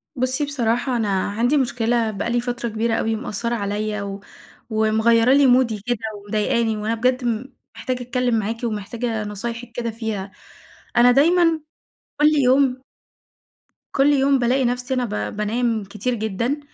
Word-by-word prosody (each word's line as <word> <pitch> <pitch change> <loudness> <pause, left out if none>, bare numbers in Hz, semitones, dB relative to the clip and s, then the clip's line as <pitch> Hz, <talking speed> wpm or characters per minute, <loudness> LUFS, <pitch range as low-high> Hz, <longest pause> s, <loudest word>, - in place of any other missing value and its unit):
بُصّي 255 +3 0
بصراحة 245 -2 0
أنا 220 -3 0 0.2
عندي 240 +8 +1
مشكلة 235 -3 +1
بقى 205 +3 -3
لي 240 0 +1
فترة 245 -1 -3
كبيرة 225 +1 -1
أوي 225 0 0
مأثّرة 235 0 -3
عليَّ 210 0 -2
و 200 0 -5 0.5
ومغيرة 220 +2 +3
لي 280 0 +5
مودي 245 -4 +3
كده 245 -1 0 0.2
ومضايقاني، 215 +2 0
وأنا 215 +2 -1
بجد 250 +3 +1
م 240 +3 -2 0.2
محتاجة 255 -1 -3
أتكلم 245 -1 0
معاكِ 225 +3 -4
ومحتاجة 225 +1 -3
نصايحِك 230 +3 -6
كده 235 -1 -2
فيها، 215 -3 -4 0.7
أنا 245 +1 +7
دايمًا 330 +4 +4 0.6
كل 300 - +6 0.2
يوم 260 0 +3 1.1
كل 280 +2 +4
يوم 275 0 +3
بالاقي 255 +2 +2
نفسي 250 +1 -1
أنا 250 -1 0 0.3
ب - - -10
بانام 225 +1 0
كتير 210 +6 -3
جدًا، 230 +5 -2
235 Hz, 145 wpm, -22 LUFS, 220-250 Hz, 1.1 s, أنا